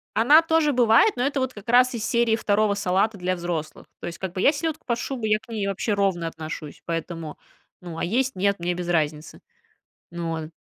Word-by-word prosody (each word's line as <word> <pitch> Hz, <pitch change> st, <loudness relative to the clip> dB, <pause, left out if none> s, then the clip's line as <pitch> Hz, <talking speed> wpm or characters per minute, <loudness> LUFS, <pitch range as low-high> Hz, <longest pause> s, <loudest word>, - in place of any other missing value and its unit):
Она 270 Hz, +9 st, +6 dB
тоже 320 Hz, -2 st, +2 dB
бывает, 245 Hz, -, +5 dB
но 245 Hz, -, -1 dB
это 280 Hz, +1 st, 0 dB
вот 260 Hz, -1 st, -2 dB
как 205 Hz, +1 st, -11 dB
раз 250 Hz, +2 st, +5 dB
из 230 Hz, -3 st, -4 dB
серии 235 Hz, -1 st, +2 dB
2 210 Hz, -1 st, +1 dB
салата 200 Hz, +2 st, 0 dB
для 185 Hz, 0 st, -1 dB
взрослых. 170 Hz, -3 st, -5 dB, 0.2 s
То -, -, -5 dB
есть, 170 Hz, -, -6 dB
как 190 Hz, -2 st, -5 dB
бы 185 Hz, -, -3 dB
я 280 Hz, -, +6 dB
селедку 315 Hz, +1 st, -3 dB
под 235 Hz, -2 st, 0 dB
шубой, 240 Hz, -3 st, -3 dB
я 215 Hz, -, +4 dB
к 220 Hz, +2 st, -23 dB
ней 210 Hz, -3 st, -2 dB
вообще 200 Hz, +2 st, -1 dB
ровно 195 Hz, -4 st, 0 dB
отношусь, 155 Hz, -2 st, -7 dB
поэтому, 165 Hz, -1 st, -5 dB, 0.4 s
ну, 175 Hz, -2 st, -8 dB
а -, -, -3 dB
есть, 255 Hz, +8 st, 0 dB
нет- 200 Hz, +1 st, +1 dB
мне 175 Hz, +1 st, -1 dB
без 175 Hz, 0 st, -5 dB
разницы. 155 Hz, -2 st, -1 dB, 0.7 s
Ну, 170 Hz, 0 st, -4 dB
вот, 160 Hz, -1 st, -4 dB
200 Hz, 215 wpm, -24 LUFS, 170-240 Hz, 0.7 s, Она